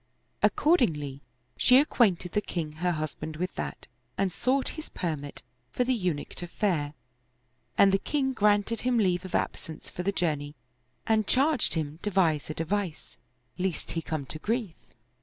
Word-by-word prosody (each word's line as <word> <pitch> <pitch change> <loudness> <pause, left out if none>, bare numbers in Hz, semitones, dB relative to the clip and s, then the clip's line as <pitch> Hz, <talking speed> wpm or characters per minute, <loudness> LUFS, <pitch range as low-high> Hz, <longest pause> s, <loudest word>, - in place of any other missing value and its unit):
Ac - - +5
cordingly 150 - +2 0.4
she 255 - +6
acquainted 210 - +3
the 210 - +1
king 165 -6 -3
her 175 +1 +1
husband 155 0 -4
with 180 +4 -3
that - - -5 0.3
and 195 -2 +1
sought 260 +8 +1
his 315 0 -7
permit 150 -5 -4 0.3
for 250 - +1
the 255 +1 +2
Eunuch 180 -10 -1
to 175 - -5
fare: 160 -6 -1 0.8
and 195 - +7
the 195 - +3
king 265 +1 0
granted 210 0 +2
him 250 -1 +2
leave 185 -3 +2
of 185 - -4
absence 160 - -3
for - - -4
the 195 +3 +1
journey 150 -6 -1 0.5
and 220 -2 +2
charged 275 - +3
him 155 0 -3
devise 175 -8 +1
a 155 - -3
device, 180 0 -3 0.4
lest 180 -3 -2
he 165 - -2
come 155 -3 -3
to 155 - -8
grief. 225 -2 -1
180 Hz, 160 wpm, -28 LUFS, 155-220 Hz, 0.8 s, and